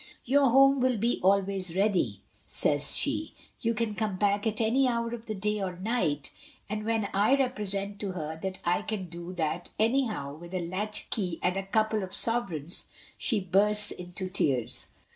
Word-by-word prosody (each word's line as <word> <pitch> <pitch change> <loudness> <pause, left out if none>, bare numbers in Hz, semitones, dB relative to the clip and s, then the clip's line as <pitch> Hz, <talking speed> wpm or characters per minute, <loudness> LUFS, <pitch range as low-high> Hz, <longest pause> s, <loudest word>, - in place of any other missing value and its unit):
*Your 275 +1 +4
home 275 +2 +6
will 255 -2 +2
be 235 +4 +1
always 190 -2 +1
ready/ 180 - +1 0.3
says 145 -1 +2
she. 305 +2 -1 0.3
*You 230 -1 +1
can 220 -1 -1
come 210 -3 -2
back 205 +2 +1
at 215 -1 -1
any 245 +4 +3
hour 235 -1 -1
of 235 -1 -7
the 215 - -3
day 210 +1 -1
or 185 -2 -3
night/ 185 - -1 0.4
and 215 0 -3
when 225 -2 +1
I 210 +7 +4
represent 205 -6 -1
to 200 -3 -3
her 160 -2 -5
that 190 0 -3
I 175 +1 +2
can 195 -5 -4
do 170 +1 -7
that 170 0 -2
anyhow 220 - +1
with 170 +4 -9
a 175 -2 -2
latchkey 190 -1 -2
and 180 - +2
a 195 - 0
couple 215 +1 +1
of 190 -1 -6
sover 230 -9 +1
eigns, 155 +5 -2 0.3
she 220 -5 +1
bursts 205 +3 +3
into 180 +1 -6
tears. 140 - 0
200 Hz, 180 wpm, -29 LUFS, 180-225 Hz, 0.4 s, home